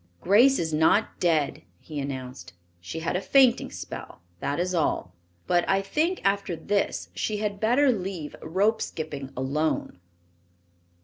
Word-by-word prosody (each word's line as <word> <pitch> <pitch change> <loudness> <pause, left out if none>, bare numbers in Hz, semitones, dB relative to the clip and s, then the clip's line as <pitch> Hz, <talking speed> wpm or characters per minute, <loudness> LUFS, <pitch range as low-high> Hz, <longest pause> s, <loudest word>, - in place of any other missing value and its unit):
"Grace 240 +8 +5
is 160 -2 -2
not 160 +8 +2
dead," 160 -5 +1 0.2
he 150 -2 -7
announced. 130 -9 -6 0.3
"She 125 - -6
had 165 - -1
a 180 - 0
fainting 255 +4 +4
spell, - - -8 0.2
that 145 - -2
is 180 +1 0
all. 150 - 0 0.3
But 175 -1 +2
I 195 0 +3
think 320 - 0
after 195 -2 +1
this 200 +4 -1
she 215 - -2
had 205 -1 -2
better 250 +6 +4
leave 185 -8 -4
rope 200 +7 +1
skipping 145 -4 -5
alone." 140 - -1
180 Hz, 140 wpm, -26 LUFS, 150-205 Hz, 0.3 s, Grace